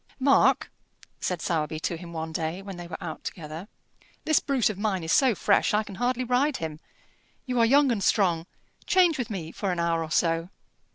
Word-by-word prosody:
"Mark," 275 +1 +3 0.5
said 180 -2 -2
Sowerby 155 -2 -1
to 170 - -1
him 170 0 -9
one 160 -1 -4
day, 165 +3 -3
when 195 -1 -7
they 175 0 -8
were 170 - -6
out 160 -2 -7
together, 160 +2 -7 0.6
"this 310 -1 +4
brute 260 -6 +1
of 195 - -9
mine 200 -4 -1
is 160 - -2
so 260 -5 +4
fresh, 205 +1 +2
I 215 - +2
can 205 - -10
hardly 250 +1 +1
ride 255 +4 +1
him; 155 -2 -5 0.7
you 250 -2 -1
are 230 - +6
young 280 +1 +5
and 210 -4 -1
strong; 175 -6 +2 0.4
change 355 -6 +4
with 245 - -2
me 170 -6 -5
for 195 -3 -2
an 175 - -2
hour 170 -1 +1
or 160 - -7
so." 165 +1 +1
190 Hz, 205 wpm, -26 LUFS, 165-245 Hz, 0.7 s, are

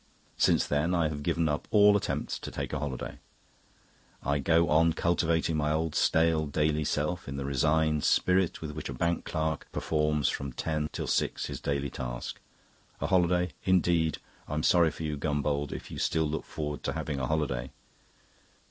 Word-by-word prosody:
Since - - +3
then 75 +5 +1
I 80 -3 +2
have 75 -1 -5
given 85 +1 +1
up 75 -1 -2
all 105 -1 +6
attempts 100 - -2
to - - -6
take - - -5
a - - -1
holiday. 70 -3 -5 1.0
I 70 0 +1
go 85 +4 +3
on 80 +2 +4
cultivating 85 -1 +1
my 75 -1 +1
old 80 0 0
stale 80 -1 +2
daily 75 +1 +1
self 75 +4 -1
in 70 0 -5
the 70 - -3
resigned 75 +3 +2
spirit 90 -1 +2
with 75 - -4
which 75 -1 -6
a - - -4
bank 85 +5 0
clerk 80 -1 -2
performs 75 -1 0
from 70 -2 -2
ten 75 +3 -2
till - - -4
six - - 0
his - - -6
daily 70 -1 -1
task. - - -5 0.6
A - - -2
holiday, 90 -1 +2
indeed! 85 -4 +2 0.3
I'm 75 +1 -2
sorry 85 -2 +5
for 80 - -7
you, 75 -2 -2
Gombauld, 75 -1 -1
if - - -7
you - - -6
still 80 -1 +1
look 75 +1 -3
forward 75 -1 -4
to - - -1
having 75 -3 -3
a 65 - -1
holiday." 70 -5 -1
75 Hz, 175 wpm, -29 LUFS, 75-80 Hz, 1.0 s, all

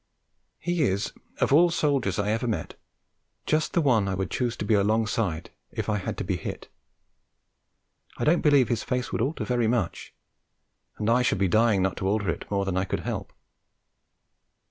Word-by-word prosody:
He 175 -1 -1
is, 100 -6 0 0.3
of - - +2
all 170 +4 +6
soldiers 140 - 0
I 100 +1 0
ever 115 +3 -1
met, 110 - -3 0.7
just 155 0 0
the 170 - +3
one 115 -9 +3
I 95 - -1
would 95 0 -3
choose 120 -2 -1
to - - -4
be 110 - +2
alongside 105 -4 0 0.2
if - - -4
I 105 -1 +1
had 95 - -4
to - - -3
be 90 -1 -1
hit. - - -7 1.5
I - - -3
don't 170 +3 +3
believe 145 -4 +4
his 120 -3 0
face 125 0 -2
would - - -1
alter 140 +7 -1
very 120 -2 +1
much, 110 -7 -1 0.9
and 105 - -2
I 120 +2 +4
should 125 - +1
be 95 0 +2
dying 110 0 +3
not 95 -1 -1
to 95 - -2
alter 100 -3 +1
it - - -7
more 100 -1 0
than 95 -1 -1
I 95 - +2
could - - -3
help. - - -4
110 Hz, 190 wpm, -26 LUFS, 100-125 Hz, 1.5 s, all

